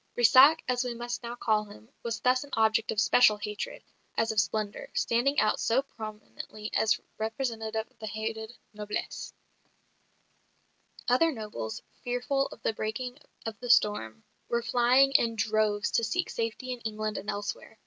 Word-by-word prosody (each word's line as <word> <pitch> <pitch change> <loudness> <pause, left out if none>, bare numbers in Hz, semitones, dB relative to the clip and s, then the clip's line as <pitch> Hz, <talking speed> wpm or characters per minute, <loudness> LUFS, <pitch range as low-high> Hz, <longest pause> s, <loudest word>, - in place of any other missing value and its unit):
Brissac 260 +6 +7
(as 250 0 +1
we 245 -1 -3
must 240 +1 -4
now 235 0 -5
call 215 -3 +1
him) 110 - -14
was 230 0 -3
thus 255 +1 +3
an 285 - -13
object 220 0 +2
of 210 - -1
special 215 -1 +5
hatred, 210 +1 -5 0.3
as 225 0 +2
of 220 - +1
splendour, 215 -1 -1
standing 250 +5 +2
out 215 0 +2
so 250 +4 +2
prominently 215 -2 -8
as 210 -4 +3 0.2
representative 220 -1 -2
of 255 -3 -34
the 220 - -5
hated 220 +2 -4 0.2
noblesse. 210 0 -4 1.8
Other 255 +7 +4
nobles, 210 - -6 0.2
fearful 250 +2 0
of - - -13
the - - +1
breaking 245 +5 -4 0.3
of 220 -2 -5
the 245 - -6
storm, 210 - +3 0.3
were 235 0 0
flying 250 +3 +4
in 235 -5 +3
droves 215 -1 +1
to 230 - +2
seek 355 +10 -1
safety 230 +2 -3
in 250 - -4
England 215 -2 -3
and 205 - -7
elsewhere. 205 +1 -5
225 Hz, 160 wpm, -29 LUFS, 215-245 Hz, 1.8 s, Brissac